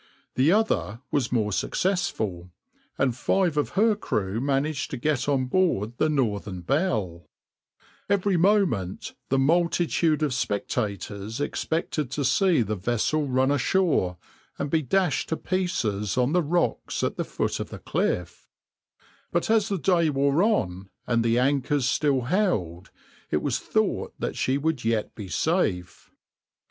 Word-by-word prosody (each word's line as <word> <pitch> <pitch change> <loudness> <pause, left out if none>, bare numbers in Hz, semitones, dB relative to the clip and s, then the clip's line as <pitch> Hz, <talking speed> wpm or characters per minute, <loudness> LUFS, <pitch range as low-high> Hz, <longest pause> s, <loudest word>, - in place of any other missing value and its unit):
The 135 +6 +3
other 205 - +1
was 135 -5 0
more 110 -4 +1
successful, 110 - -1 0.5
and 130 -4 +1
five 175 +5 +1
of 150 - 0
her 220 +1 +4
crew 105 - -2
managed 140 +2 -1
to 135 - -4
get 145 +1 0
on 135 -2 +2
board 125 - 0
the 155 - +3
{\itshape{Northern 105 -10 -1
Belle}}. 105 - -1 0.8
Every 200 -1 +2
moment 170 - +1 0.2
the 135 - +2
multitude 165 +1 +2
of 145 -4 0
spectators 105 -1 -3
expected 150 -1 -2
to 140 +2 -2
see 170 - +3
the 105 0 -2
vessel 120 +9 0
run 130 +1 +2
ashore 145 - +1 0.4
and 140 0 -3
be 160 - +3
dashed 175 +4 0
to 160 - -1
pieces 110 - -1
on 125 +4 +2
the 180 - +4
rocks 170 +3 -1
at - - 0
the - - -2
foot - - -2
of - - -4
the - - -8
cliff; 90 -1 -2 0.8
but 170 +5 0
as 220 -1 +3
the 200 - 0
day 170 -2 +2
wore 140 +2 +2
on 95 - 0 0.2
and 115 -1 +1
the 115 0 +2
anchors 135 +1 +1
still 140 -1 +2
held, 120 - -1 0.4
it - - 0
was - - 0
thought - - -1
that - - -3
she 130 +1 +1
would 150 -2 -1
yet 115 -1 0
be 105 -3 -8
safe. 95 - -1
140 Hz, 145 wpm, -25 LUFS, 110-170 Hz, 0.8 s, her